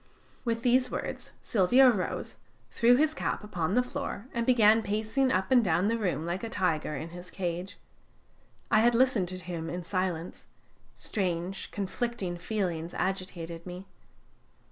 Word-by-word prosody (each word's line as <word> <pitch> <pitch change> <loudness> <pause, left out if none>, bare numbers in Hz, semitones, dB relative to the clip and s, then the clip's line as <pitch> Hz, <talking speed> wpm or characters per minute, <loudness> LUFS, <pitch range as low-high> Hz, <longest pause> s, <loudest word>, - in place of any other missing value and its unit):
With 230 -1 -1
these 250 +1 +3
words, - - -5
Silvio 240 +6 +5
rose, 190 -6 -3 0.3
threw 240 +1 +5
his 310 +4 +3
cap - - -2
upon 180 -3 -2
the 250 - +4
floor, 250 -4 -5
and 235 -1 -1
began 225 -3 +6
pacing 220 +6 0
up 190 +1 0
and 250 -2 +6
down 180 +2 +2
the 230 - +1
room 170 -7 -1
like 175 +4 -3
a 230 - -3
tiger 160 -7 0
in 155 +4 -5
his 175 +1 -9
cage. 180 +1 -4 0.9
I 215 - +6
had 235 +1 +4
listened 245 -7 +3
to 185 +1 -6
him 170 -2 -5
in 175 +2 -4
silence; 180 -1 -3 0.5
strange 185 -1 -2
conflicting 200 -2 -3
feelings 175 -4 -2
agitated 175 -3 -3
me. 180 +2 -7
190 Hz, 150 wpm, -29 LUFS, 175-230 Hz, 0.9 s, began